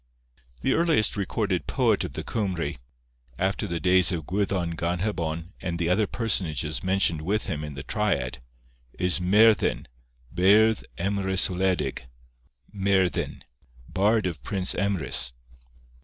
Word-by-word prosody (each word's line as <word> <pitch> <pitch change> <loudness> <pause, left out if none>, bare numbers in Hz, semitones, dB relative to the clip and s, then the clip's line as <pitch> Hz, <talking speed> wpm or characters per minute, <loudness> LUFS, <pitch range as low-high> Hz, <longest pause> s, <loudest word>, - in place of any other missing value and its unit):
The 135 - +2
earliest 165 -9 +2
recorded 100 -2 -1
poet - - +2
of - - -5
the - - -5
Cymry, 95 - -2 0.6
after 95 +3 -1
the 85 -2 -3
days 90 +1 +4
of 80 -4 -3
Gwyddon 95 -2 -1
Ganhebon 85 -1 -2
and 85 -2 -3
the 85 0 0
other 100 +3 +2
personages 85 -10 -1
mentioned 95 -4 +1
with 100 +7 -1
him 75 -5 -3
in 75 -2 -6
the 70 - -6
triad, 65 -1 -1 0.6
is 90 -1 +2
Merddin, 105 +4 +4 0.5
Beirdd 105 +5 +4
Emrys 95 0 +1
Wledig, 95 0 0
or 65 - -18 0.7
Merddin, 95 -2 0 0.4
Bard 105 +3 +2
of 85 -7 -3
Prince 95 +7 -1
Emrys. 90 -10 -1
95 Hz, 125 wpm, -26 LUFS, 85-100 Hz, 0.7 s, days